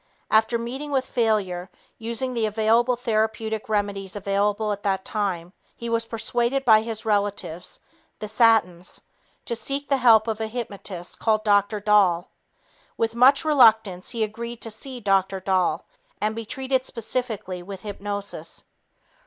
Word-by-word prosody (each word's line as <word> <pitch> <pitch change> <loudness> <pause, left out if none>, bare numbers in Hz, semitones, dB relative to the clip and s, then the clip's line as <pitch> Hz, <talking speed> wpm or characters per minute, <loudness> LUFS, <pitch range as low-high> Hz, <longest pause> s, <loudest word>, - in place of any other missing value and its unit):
After 220 +2 +4
meeting 255 +6 -5
with 265 -2 0
failure, 205 -8 0 0.3
using 235 +3 -2
the 230 -2 0
available 225 +3 +2
therapeutic 220 -2 -1
remedies 200 -2 -1
available 205 +2 0
at 205 0 -3
that 195 -2 -1
time, 185 -4 -2 0.2
he 235 - -6
was 230 0 0
persuaded 240 +4 -1
by 220 -2 +7
his 225 -1 -5
relatives, 205 -5 -2 0.4
the 215 - -6
Satins, 210 -5 +2 0.4
to 235 - -2
seek 275 +4 -3
the 275 - +3
help 230 -3 +5
of 220 -1 -2
a 220 - -1
hypnotist 200 -6 -5
called 215 -1 +1
Dr. 205 0 +2
Dahl. 195 -4 +3 0.7
With 225 0 0
much 260 +5 +5
reluctance, 220 -10 +4
he 230 -2 -1
agreed 230 +2 -5
to 225 - -4
see 255 +4 -6
Dr. 195 -2 +1
Dahl 185 -2 0 0.3
and 215 +1 -1
be 230 0 -5
treated 265 0 -1
specifically 225 -7 -3
with 190 +1 -9
hypnosis. 205 0 -5
220 Hz, 145 wpm, -24 LUFS, 200-235 Hz, 0.7 s, by